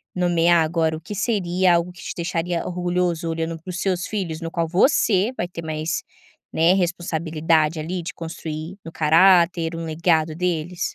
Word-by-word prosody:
nomear 175 -2 +3
agora, 160 -1 0
o - - -12
que 205 - -7
seria 185 -4 +2
algo 170 +1 0
que 180 - -14
te - - -5
deixaria 170 0 -2
orgulhoso, 175 -2 -1
olhando 165 0 -2
para 185 - -11
os 180 0 -4
seus 185 -2 0
filhos 175 -6 -4
no 165 0 -5
qual 165 -1 -1
você 195 - +3
vai 175 - -2
ter 170 -2 -8
mais, 155 +1 -2 0.5
né, 165 +3 +4
responsabilidade, 165 -3 0
ali, 175 +3 -3
de - - -6
construir 160 +1 -6
no 165 - -8
caráter 170 +1 +4
um 165 0 -5
legado 160 -1 +1
deles? 175 0 -2
170 Hz, 170 wpm, -22 LUFS, 160-180 Hz, 0.5 s, né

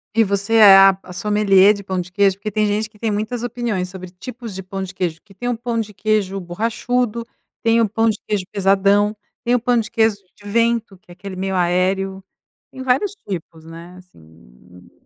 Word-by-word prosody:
E 225 - +5
você 200 +2 -1
é 205 -3 +9
a 195 -1 +6
a 180 - -11
sommelier 205 0 +4
de 200 -1 -8
pão 185 -1 -3
de 180 +1 -6
queijo? 195 0 +2
Porque 215 +1 -5
tem 215 +1 +1
gente 210 +1 -1
que 215 - -22
tem 225 -2 -1
muitas 220 +3 -3
opiniões 235 -6 -2
sobre 185 -1 -9
tipos 225 +3 -9
de 190 - -6
pão 195 +1 -6
de 190 +1 -7
queijo. 170 -3 -3
Que 200 -2 -19
tem 245 +6 -6
um 245 - 0
pão 235 0 -3
de 210 -2 -4
queijo 205 -2 0
borrachudo, 230 +5 -2 0.4
tem 230 0 +3
um 220 - +3
pão 225 +2 +1
de 215 - -1
queijo 205 -3 -1
pesadão, 200 +1 +2 0.3
tem 245 +1 +2
o - - +2
pão 245 +1 +1
de 225 -2 -1
queijo 225 -3 +2 0.2
de 205 0 -12
vento 230 -2 0
que 180 - -20
é - - -10
aquele 195 +1 -9
meio 190 0 -3
aéreo, 190 +2 0 0.5
tem 260 - -9
vários 265 +11 +1
tipos 165 -4 -7
né, 170 +2 -11
assim. 80 - -19
200 Hz, 210 wpm, -20 LUFS, 185-225 Hz, 0.5 s, é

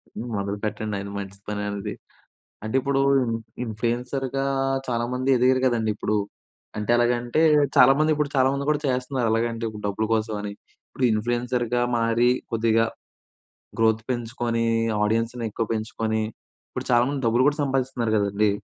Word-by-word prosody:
హ్మ్. 120 +1 -5
మొదలు 100 +1 -2
పెట్టండి 105 -1 -3
అది 100 0 -7
మంచి 100 0 -8
పని 105 -1 -3
అనేది. 100 -1 -4 0.7
అంటే 110 +3 -4
ఇప్పుడు 140 +1 0 0.2
ఇన్ 115 -2 -1 0.3
ఇన్‌ఫ్లుయెన్సర్‌గా 125 +4 -2 0.4
చాలామంది 125 +2 -1
ఎదిగారు 130 +1 +3
గదండీ 115 -3 +1
ఇప్పుడు. 105 0 -1 0.6
అంటే 105 +1 -2
ఎలాగంటే 120 +5 +1 0.3
చాలామంది, 155 +3 +6
ఇప్పుడు 150 -1 -1
చాలామంది 135 +2 +2
కూడా 150 -1 +1
చేస్తున్నారు. 125 -1 0
ఎలాగంటే 115 0 -1
ఇప్పుడు 105 -1 -9
డబ్బుల 105 +2 -1
కోసం 110 -1 -1
అని, 105 0 -5 0.4
ఇప్పుడు 130 - -3
ఇన్‌ఫ్లుయెన్సర్‌గా 120 +2 0
మారి 115 +1 +2 0.2
కొద్దిగా 115 0 +3 0.9
గ్రోత్ 110 0 +3
పెంచుకొని 120 -1 -1 0.4
ఆడియన్స్‌ని 115 +2 0
ఎక్కువ 115 +2 -2
పెంచుకొని 110 0 -2 0.5
ఇప్పుడు - - -5
చాలామంది 125 +3 +2
డబ్బులు 120 +3 +3
గూడా 145 +1 +2
సంపాదిస్తున్నారు 130 -4 -1
గదండీ. 100 0 +2
115 Hz, 135 wpm, -24 LUFS, 110-125 Hz, 0.9 s, చాలామంది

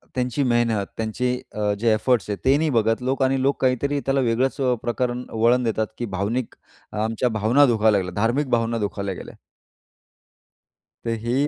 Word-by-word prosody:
त्यांची 125 +2 0
मेहनत, 120 -5 +1
त्यांचे 115 +3 -1 0.2
अ, 105 -1 0
जे 115 0 +3
एफर्ट्स 110 +1 +1
आहेत 100 - -3
ते 135 +2 +5
नाही 155 +1 +1
बघत 115 -2 +1
लोक 135 +1 0
आणि 130 0 +1
लोक 140 +2 0
काहीतरी 135 +3 +1
त्याला 135 0 +1
वेगळंच 130 +5 0
अ, 125 -1 +2
प्रकरण 125 +1 -2
वळण 120 +3 +3
देतात 110 -2 0
की 120 - -3
भावनिक 115 +6 -2 0.4
अ, - - -7
आमच्या 115 +3 0
भावना 120 +7 +5
दुखावल्या 110 -5 +3
गेल्या, 90 -1 -6
धार्मिक 130 +5 +1
भावना 115 -1 +1
दुखावल्या 100 -2 -3
गेल्या. - - -10 1.7
तर 115 - -1
हेही 130 +5 +1
120 Hz, 175 wpm, -23 LUFS, 110-130 Hz, 1.7 s, ते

